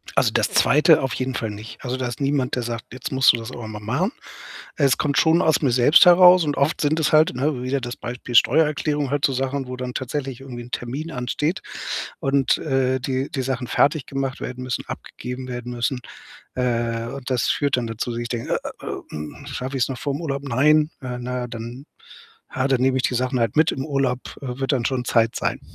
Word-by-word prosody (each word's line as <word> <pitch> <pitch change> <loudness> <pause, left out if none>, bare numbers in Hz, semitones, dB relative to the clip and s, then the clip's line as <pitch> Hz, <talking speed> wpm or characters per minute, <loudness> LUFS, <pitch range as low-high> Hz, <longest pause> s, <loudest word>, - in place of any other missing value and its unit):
Also, - - +3
das - - +1
2. 150 +3 +5
auf 135 -2 -2
jeden 130 0 -2
Fall 110 -2 -2
nicht. 105 +2 -9
Also, 125 -1 -2
da 130 -1 -2
ist 120 - -6
niemand, 140 -2 0
der 125 - -2
sagt: 115 0 -6
„Jetzt 125 - -6
musst 130 -1 +6
du - - -1
das 115 +1 -7
aber 120 -3 -7
mal 110 -1 -7
machen.“ 130 - -1 0.6
Es 140 -3 +3
kommt 145 -2 0
schon 165 +2 +4
aus 160 -3 +3
mir 135 -5 +2
selbst 125 +9 +6
heraus 180 0 +8
und 145 -2 -1
oft 140 +4 +1
sind 155 +1 +1
es 160 - +1
halt 155 +1 +5
ne, 130 -1 -1
wieder 135 +2 -1
das 120 0 -5
Beispiel 120 0 -6
Steuererklärung, 150 +3 +3
halt 145 +1 +1
so 135 - +1
Sachen, 135 +1 -2
wo 130 - -5
dann 125 0 -5
tatsächlich 130 0 -4
irgendwie 125 -3 -8
'n 120 - -14
Termin 140 +7 -4
ansteht 150 +7 -2 0.6
und, 135 -1 +2
äh, 130 -2 0
die 130 +1 -2
die 135 - -2
Sachen 130 -1 -2
fertiggemacht 135 -1 0
werden 125 0 -5
müssen, 125 -2 -3
abgegeben 125 +1 -7
werden 125 0 -5
müssen. 120 +2 -1 0.5
Äh, 115 -2 -1
und 135 +1 -7
das 125 -3 +1
führt 140 -2 +1
dann 125 -2 -2
dazu, 115 +2 -4
dass 120 0 -3
ich 120 - -4
denke: 120 -1 -2 0.3
„Äh, - - -10 0.2
hm, 75 - -8
schaffe 130 -1 -4
ich's 125 - +1
noch 130 -2 -5
vorm 140 +3 -3
Urlaub? 140 -3 -3
Nein. 150 +4 +3
Äh, 125 -1 -4
na 125 0 -3
dann 120 +3 -7 0.7
ja, 130 - +1
dann 135 -2 +2
nehme 130 0 +2
ich 130 - +1
die 125 - 0
Sachen 130 +1 0
halt 115 -3 0
mit 155 +1 +4
in 130 - -3
Urlaub, 135 -3 0 0.2
äh, 125 -2 -5
wird 135 +2 -1
dann 125 -4 0
schon 130 -2 -1
Zeit 115 -1 +2
sein.“ - - -1
130 Hz, 220 wpm, -22 LUFS, 125-140 Hz, 0.7 s, heraus